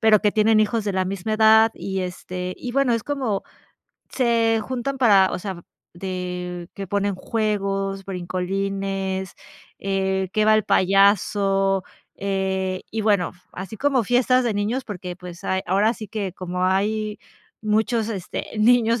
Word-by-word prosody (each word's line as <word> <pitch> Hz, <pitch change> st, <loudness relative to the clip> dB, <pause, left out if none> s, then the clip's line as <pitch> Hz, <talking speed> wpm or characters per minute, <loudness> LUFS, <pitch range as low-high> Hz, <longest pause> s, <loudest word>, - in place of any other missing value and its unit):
pero, 220 Hz, -2 st, +5 dB
que 210 Hz, -, +2 dB
tienen 215 Hz, 0 st, +4 dB
hijos 215 Hz, 0 st, +1 dB
de 200 Hz, -, -1 dB
la 190 Hz, 0 st, 0 dB
misma 195 Hz, +3 st, -2 dB
edad 220 Hz, +1 st, +6 dB
y 190 Hz, -1 st, -3 dB
este, 180 Hz, 0 st, -5 dB
y 245 Hz, -, -6 dB
bueno, 275 Hz, -1 st, +2 dB
es 230 Hz, -, -2 dB
como 260 Hz, -9 st, -1 dB, 0.7 s
se 230 Hz, -3 st, +2 dB
juntan 260 Hz, +3 st, -3 dB
para, 200 Hz, -7 st, +5 dB
o -, -, -2 dB
sea, 185 Hz, -2 st, -6 dB, 0.3 s
de 180 Hz, -1 st, -5 dB
que 200 Hz, -1 st, -6 dB
ponen 200 Hz, +1 st, 0 dB
juegos, 195 Hz, -2 st, -1 dB
brincolines, 190 Hz, +1 st, -3 dB, 0.4 s
eh, 190 Hz, -1 st, -1 dB
que 215 Hz, -, +2 dB
va 215 Hz, -, +6 dB
el 215 Hz, -, +3 dB
payaso, 195 Hz, 0 st, +3 dB, 0.3 s
eh, 190 Hz, -1 st, -1 dB
y 220 Hz, -, -2 dB
bueno, 205 Hz, -5 st, +2 dB, 0.2 s
así 190 Hz, +3 st, -7 dB
como 275 Hz, 0 st, +2 dB
fiestas 255 Hz, +2 st, +3 dB
de 230 Hz, -3 st, 0 dB
niños, 220 Hz, +6 st, -1 dB
porque, 180 Hz, -4 st, -6 dB
pues, 180 Hz, -1 st, -10 dB
hay 190 Hz, -, 0 dB
ahora 200 Hz, +5 st, +3 dB
sí 215 Hz, -3 st, -8 dB
que 200 Hz, -3 st, -3 dB
como 180 Hz, 0 st, -3 dB
hay 210 Hz, +3 st, 0 dB, 0.4 s
muchos 220 Hz, +1 st, +1 dB
este 195 Hz, -6 st, -4 dB
niños 230 Hz, +1 st, +4 dB
200 Hz, 150 wpm, -23 LUFS, 190-220 Hz, 0.7 s, edad